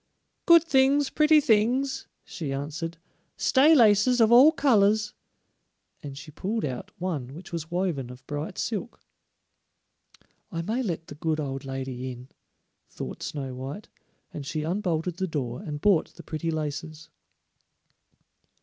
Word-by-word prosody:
"Good 335 Hz, -2 st, +8 dB
things, 275 Hz, -2 st, +3 dB
pretty 305 Hz, 0 st, +5 dB
things," 260 Hz, +1 st, +1 dB, 0.2 s
she 155 Hz, -6 st, -6 dB
answered; 155 Hz, +4 st, -4 dB, 0.4 s
"stay 295 Hz, +4 st, +5 dB
laces 235 Hz, 0 st, +5 dB
of 225 Hz, -1 st, +5 dB
all 260 Hz, +6 st, +8 dB
colors," 215 Hz, -8 st, +3 dB, 0.9 s
and 140 Hz, -2 st, -8 dB
she 155 Hz, +1 st, -10 dB
pulled 210 Hz, +8 st, -2 dB
out 130 Hz, -3 st, -5 dB
one 145 Hz, -8 st, -4 dB
which 175 Hz, +1 st, -11 dB
was 160 Hz, -2 st, -4 dB
woven 175 Hz, -8 st, -2 dB
of 125 Hz, +1 st, -12 dB
bright 150 Hz, +4 st, -5 dB
silk. 230 Hz, +1 st, -4 dB, 1.5 s
"I 165 Hz, -1 st, -3 dB
may 225 Hz, +8 st, -1 dB
let 170 Hz, -8 st, -3 dB
the -, -, -10 dB
good 155 Hz, +1 st, -2 dB
old 135 Hz, -2 st, -4 dB
woman 135 Hz, 0 st, -4 dB
in," 125 Hz, 0 st, -7 dB, 0.6 s
thought -, -, -7 dB
Snow 135 Hz, -3 st, -5 dB
white, 135 Hz, +10 st, -7 dB, 0.4 s
and 145 Hz, -, -6 dB
she 150 Hz, +2 st, -3 dB
unbolted 175 Hz, -2 st, -1 dB
the 190 Hz, 0 st, -1 dB
door 135 Hz, -3 st, -4 dB
and 150 Hz, -7 st, -5 dB
bought 195 Hz, -1 st, +2 dB
the -, -, -11 dB
pretty 160 Hz, +1 st, -4 dB
laces. 155 Hz, 0 st, -4 dB
165 Hz, 140 wpm, -26 LUFS, 145-220 Hz, 1.5 s, Good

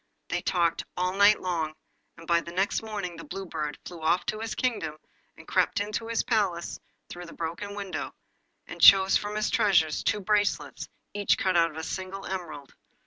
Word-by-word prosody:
They 175 Hz, +1 st, -1 dB
talked 170 Hz, -3 st, +1 dB
all 180 Hz, +1 st, 0 dB
night 205 Hz, +2 st, +5 dB
long, 165 Hz, -4 st, -2 dB, 0.4 s
and 165 Hz, -1 st, -13 dB
the 170 Hz, 0 st, +1 dB
next 190 Hz, +4 st, 0 dB
morning 205 Hz, -6 st, -5 dB
the 165 Hz, -, -8 dB
Blue 195 Hz, 0 st, -6 dB
Bird 150 Hz, -4 st, -4 dB
flew 170 Hz, -2 st, -9 dB
off 170 Hz, +3 st, +2 dB
to 215 Hz, -, -2 dB
his 220 Hz, -3 st, -4 dB
kingdom, 190 Hz, -12 st, -1 dB, 0.4 s
and -, -, -14 dB
crept -, -, +2 dB
into 210 Hz, +2 st, -3 dB
his 230 Hz, -1 st, 0 dB
palace 195 Hz, -7 st, -1 dB, 0.3 s
through 175 Hz, 0 st, -9 dB
the -, -, -11 dB
broken 170 Hz, +5 st, -5 dB
window, 200 Hz, -2 st, -4 dB, 0.5 s
and -, -, -9 dB
chose 190 Hz, 0 st, +8 dB
from 210 Hz, 0 st, -1 dB
his 215 Hz, 0 st, 0 dB
treasures 160 Hz, -7 st, +3 dB
two 210 Hz, -, 0 dB
bracelets, 205 Hz, +1 st, 0 dB, 0.2 s
each 205 Hz, -1 st, +2 dB
cut 185 Hz, -1 st, 0 dB
out 165 Hz, -1 st, +4 dB
of 155 Hz, -, -12 dB
a 160 Hz, -, -4 dB
single 190 Hz, +3 st, -5 dB
emerald. 160 Hz, -7 st, -6 dB
185 Hz, 185 wpm, -27 LUFS, 170-205 Hz, 0.5 s, chose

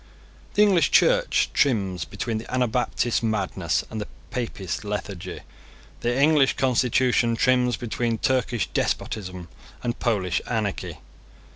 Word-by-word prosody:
The 210 Hz, -, +6 dB
English 190 Hz, -5 st, +4 dB
Church -, -, +3 dB
trims 95 Hz, -10 st, +1 dB
between 110 Hz, +2 st, -3 dB
the 115 Hz, -, -10 dB
Anabaptist 120 Hz, -1 st, 0 dB
madness 110 Hz, -4 st, -1 dB
and 110 Hz, -1 st, -4 dB
the 105 Hz, -, -5 dB, 0.2 s
Papist 110 Hz, -8 st, -4 dB
lethargy. 100 Hz, -3 st, -5 dB, 0.6 s
The 120 Hz, +2 st, 0 dB
English 145 Hz, -2 st, +4 dB
constitution 125 Hz, -2 st, +2 dB
trims 125 Hz, 0 st, +2 dB
between 120 Hz, -1 st, -2 dB
Turkish 125 Hz, -3 st, 0 dB
despotism 95 Hz, -4 st, -2 dB, 0.4 s
and 120 Hz, -1 st, -2 dB
Polish 95 Hz, -7 st, 0 dB
anarchy. 110 Hz, -4 st, -2 dB
120 Hz, 115 wpm, -24 LUFS, 105-125 Hz, 0.6 s, The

